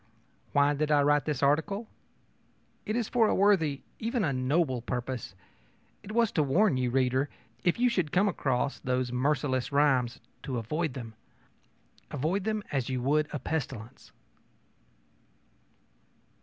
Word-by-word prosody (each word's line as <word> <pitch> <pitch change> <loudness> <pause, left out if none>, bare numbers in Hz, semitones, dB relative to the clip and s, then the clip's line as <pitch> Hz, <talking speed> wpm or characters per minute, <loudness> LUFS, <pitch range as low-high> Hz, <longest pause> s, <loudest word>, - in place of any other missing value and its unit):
Why 145 +1 +4
did 150 +1 -1
I 145 -1 +4
write 145 0 +3
this 150 -3 -2
article? 195 +10 +1 1.0
It 215 - -1
was 235 -3 0
for 230 -3 +3
a - - +2
worthy, 175 -8 +3 0.2
even 230 0 -1
a 140 - +1
noble, 130 0 +1
purpose. 125 -3 -4 0.7
It 205 - -9
was 230 -1 +2
to 155 - +1
warn 155 +5 +3
you, 125 -1 0
reader, 130 +2 +1 0.3
if 175 - +2
you 250 +1 +3
should 185 -11 0
came 195 +3 +3
across 135 -7 -1
those 125 -1 -1
merciless 130 -1 0
rhymes, 135 -4 +2 0.2
to 130 -4 -4
avoid 150 +6 -2
them 115 -4 -7 1.0
avoid 180 +8 -1
them 215 -1 -1
as 135 -3 -1
you 130 -1 -1
would 150 +3 +2
a - - -2
pestilence! 130 -4 -5
145 Hz, 140 wpm, -29 LUFS, 130-175 Hz, 1.0 s, Why